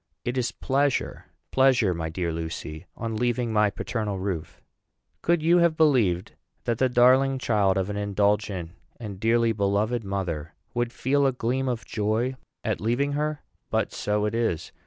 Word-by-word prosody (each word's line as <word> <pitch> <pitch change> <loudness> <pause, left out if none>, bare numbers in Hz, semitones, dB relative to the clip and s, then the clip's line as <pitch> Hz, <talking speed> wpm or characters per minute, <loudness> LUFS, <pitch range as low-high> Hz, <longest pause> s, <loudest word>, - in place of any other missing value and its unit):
It 120 - -1
is 125 -2 0
pleasure, 140 +1 0 0.3
pleasure, 130 -8 +4
my 80 -1 -3
dear 85 +1 -2
Lucy, 80 0 -5
on 115 -1 -3
leaving 120 0 0
my 105 -1 +4
paternal 105 0 -3
roof. 95 -4 -4 0.6
Could 170 -2 +2
you 170 +2 +5
have 170 -2 +3
believed 120 - +3 0.3
that 115 -1 -1
the 130 - +3
darling 130 +2 +5
child 105 -6 +2
of 95 -1 0
an 105 0 -4
indulgent 100 -3 0 0.3
and 105 -5 -7
dearly 115 +1 +3
beloved 105 +3 0
mother 90 -6 -3 0.2
would 120 -1 -1
feel 140 +3 +2
a - - +3
gleam 130 +2 -1
of 120 -2 -3
joy 110 +4 -1 0.3
at 110 -2 -1
leaving 120 +6 +1
her? 150 +1 -2 0.3
But - - 0
so 105 0 0
it 105 - -1
is. 110 -9 -1
115 Hz, 160 wpm, -26 LUFS, 100-130 Hz, 0.6 s, you